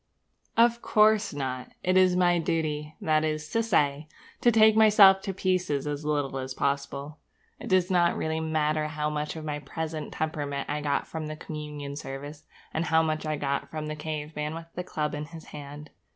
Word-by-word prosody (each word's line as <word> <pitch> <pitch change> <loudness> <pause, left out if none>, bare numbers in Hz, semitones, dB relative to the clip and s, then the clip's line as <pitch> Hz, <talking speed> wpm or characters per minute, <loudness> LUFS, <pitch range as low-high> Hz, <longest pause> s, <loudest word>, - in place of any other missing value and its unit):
Of 235 0 +4
course 215 0 +4
not! 130 -3 -4
It 185 +1 +2
is 185 -1 +5
my 175 -1 +3
duty, 155 -2 -2
that 155 -1 +2
is 155 0 -2
to 230 - +1
say, 150 -9 +1 0.3
to 240 - +5
take 220 -1 +6
myself 205 -3 +7
to 195 - -3
pieces 185 -7 0
as 145 0 -3
little 145 -3 -1
as 130 0 -5
possible. 140 +2 -2 0.4
It - - -7
does 185 0 +2
not 175 -2 +3
really 160 0 -1
matter 155 -1 0
how 150 0 -2
much 150 +1 -3
of 160 -1 -7
my 150 -1 -3
present 155 +2 -5
temperament 145 -3 -3
I 150 0 -2
got 145 -1 0
from 160 -1 -5
the 155 - -5
communion 150 -2 -6
service, 145 +2 -8 0.3
and 160 +1 -1
how 160 -2 +3
much 155 0 -2
I 155 - 0
got 140 -1 -2
from 155 -1 -5
the 155 0 -4
caveman 150 0 -4
with 165 0 -7
the 180 - -4
club 150 -4 -3
in 150 0 -4
his 160 0 -11
hand. 145 0 -9
155 Hz, 190 wpm, -27 LUFS, 150-170 Hz, 0.4 s, myself